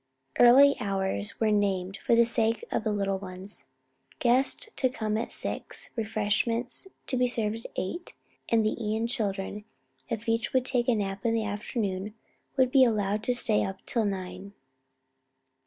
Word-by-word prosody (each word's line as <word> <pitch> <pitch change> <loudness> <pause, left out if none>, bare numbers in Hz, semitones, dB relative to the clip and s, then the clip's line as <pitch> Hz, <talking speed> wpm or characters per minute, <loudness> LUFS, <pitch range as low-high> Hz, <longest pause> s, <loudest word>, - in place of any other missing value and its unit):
Early 275 +4 +8
hours 190 - -2
were 220 -1 +2
named 195 -2 0
for 235 - +2
the 235 0 +6
sake 230 -1 0
of - - 0
the 220 - 0
little 195 -2 0
ones; 185 -4 -10 0.5
guests 255 - +2
to 260 - +2
come 215 -3 -2
at 225 - -2
six, - - -6
refreshments 225 - 0 0.2
to - - -1
be 250 0 +3
served 225 -2 -2
at - - -26
eight, 345 - -4 0.4
and 225 -2 +3
the 215 - +1
Ion 220 +1 0
children, 210 -4 -2 0.5
if 230 0 -4
each 225 -1 0
would 255 -1 +2
take 250 -2 0
a 245 - +4
nap 195 -2 -3
in 230 -1 +2
the 225 -1 0
afternoon, 205 -1 -3 0.4
to 260 -2 +5
be 260 +1 +5
allowed 210 -3 +1
to 250 - +2
stay 225 -3 +2
up 190 0 -6
till 230 -3 0
nine. 195 0 -5
220 Hz, 165 wpm, -28 LUFS, 200-235 Hz, 0.5 s, Early